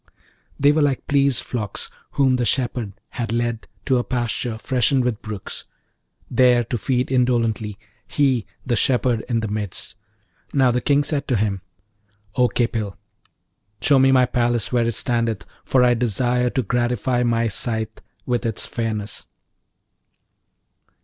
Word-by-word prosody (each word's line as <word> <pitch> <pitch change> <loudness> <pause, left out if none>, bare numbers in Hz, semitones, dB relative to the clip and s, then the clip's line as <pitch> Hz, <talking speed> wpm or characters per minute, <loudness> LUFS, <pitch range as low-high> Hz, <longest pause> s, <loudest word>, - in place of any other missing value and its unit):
They 145 +1 +6
were 155 +1 +2
like 140 -3 +1
pleased 140 -3 +2
flocks 110 -5 -5 0.2
whom 130 -2 +3
the 125 - 0
shepherd 120 -4 -1 0.2
hath 120 -3 -4
led 120 -1 -1 0.2
to 130 -3 +3
a - - 0
pasture 120 -2 -2
freshened 130 +2 +1
with 120 -3 -1
brooks, 105 -3 -6 0.6
there 125 -1 +4
to 120 +2 -3
feed 125 +4 0
indolently; 115 -5 +1 0.3
he, 130 -6 +1 0.2
the 120 - +1
shepherd, 125 -1 +1
in 115 -2 +1
the 110 - -2
midst. 105 -4 -4 0.6
Now, 130 -3 +4
the 125 +1 0
King 145 +3 +3
said 145 -1 -1
to 125 - +1
him, 100 -3 0 0.7
'O 125 -1 +4
Khipil, 110 -3 -1 0.8
show 140 -2 +4
me 135 0 +5
my 130 -1 +5
palace 120 -1 0
where 120 -2 +2
it 115 - -1
standeth, 115 -2 0 0.2
for 130 -1 +3
I 125 -1 +5
desire 125 +1 +1
to 130 - -1
gratify 120 +2 0
my 115 -1 +2
sight 110 +1 -2 0.2
with 120 -1 0
its 115 -2 -2
fairness.' 110 -3 -4
120 Hz, 145 wpm, -22 LUFS, 115-130 Hz, 0.8 s, They